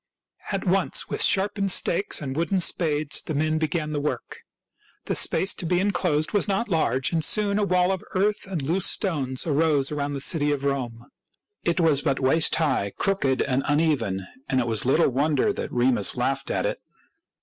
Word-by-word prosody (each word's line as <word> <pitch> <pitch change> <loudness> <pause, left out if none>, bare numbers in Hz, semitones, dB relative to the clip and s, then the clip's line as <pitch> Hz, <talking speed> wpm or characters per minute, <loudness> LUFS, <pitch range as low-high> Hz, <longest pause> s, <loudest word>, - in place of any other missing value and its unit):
At 195 -1 -2
once, 190 0 +1
with - - 0
sharpened 200 0 +2
stakes 180 -2 +2
and 135 -1 -4
wooden 170 +5 0
spades, 155 -4 +1
the 155 - -5
men 155 +2 0
began 155 0 -2
the 145 - -1
work. 150 +1 -4 0.7
The - - -1
space 190 - +2
to 180 - -5
be 180 +1 +2
inclosed 175 -5 0
was 205 - +1
not 205 +3 -1
large, 145 -6 +1
and 160 -1 0
soon 205 +3 +1
a - - +1
wall 180 -1 +2
of 190 - -3
earth 205 +2 0
and 180 -7 -3
loose 170 +7 +1
stones 140 -10 -2
arose 150 -3 +1
around 145 -1 -2
the - - -3
new - - -3
city 150 0 0
of 140 -1 -2
Rome. 125 -4 -3 0.6
It 170 +1 0
was 155 -5 +3
but 135 - 0
waist 145 +5 +2
high, 130 -11 0
crooked, 190 -10 0
and 130 0 0
uneven; 145 - 0 0.2
and 130 -2 +1
it 125 - 0
was 115 -1 -1
little 140 +6 +3
wonder 145 +2 +1
that - - -5
Remus 120 -3 +1
laughed 135 +2 -1
at - - -1
it. - - -2
155 Hz, 190 wpm, -24 LUFS, 135-180 Hz, 0.7 s, was